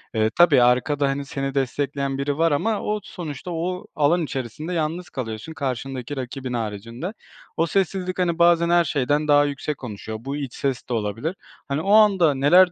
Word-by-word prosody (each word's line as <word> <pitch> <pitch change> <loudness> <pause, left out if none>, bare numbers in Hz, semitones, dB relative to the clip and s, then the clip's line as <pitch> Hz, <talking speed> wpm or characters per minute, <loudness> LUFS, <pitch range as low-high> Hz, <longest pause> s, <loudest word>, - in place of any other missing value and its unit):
Iıı, 110 0 +3
tabii 160 -7 +6
arkada, 140 +4 +2
hani, 140 +1 -2
seni 135 0 -4
destekleyen 140 +1 -1
biri 140 +1 -1
var 165 0 +3
ama 205 +9 0
o 210 0 -1
sonuçta 175 -1 -7
o 180 +2 -3
alan 160 +3 +3
içerisinde 140 +5 -4
yalnız 165 +2 -2
kalıyorsun 115 +3 -5
karşındaki 135 -1 -4
rakibin 130 0 -5
haricinde. 115 - -4 0.4
O 165 - +3
sessizlik, 185 0 -1
hani, 175 -2 +1
bazen 170 0 +5
her 175 0 +5
şeyden 145 +1 0
daha 145 0 +5
yüksek 145 +1 -3
konuşuyor, 110 -2 -6
bu 135 +3 -4
iç 140 -4 -5
ses 135 -3 -3
de - - -1
olabilir. 115 - -2 0.3
Hani, 140 +2 -1
o 195 - -1
anda 195 -8 +6
neler 175 +7 +6
145 Hz, 175 wpm, -23 LUFS, 130-170 Hz, 0.4 s, tabii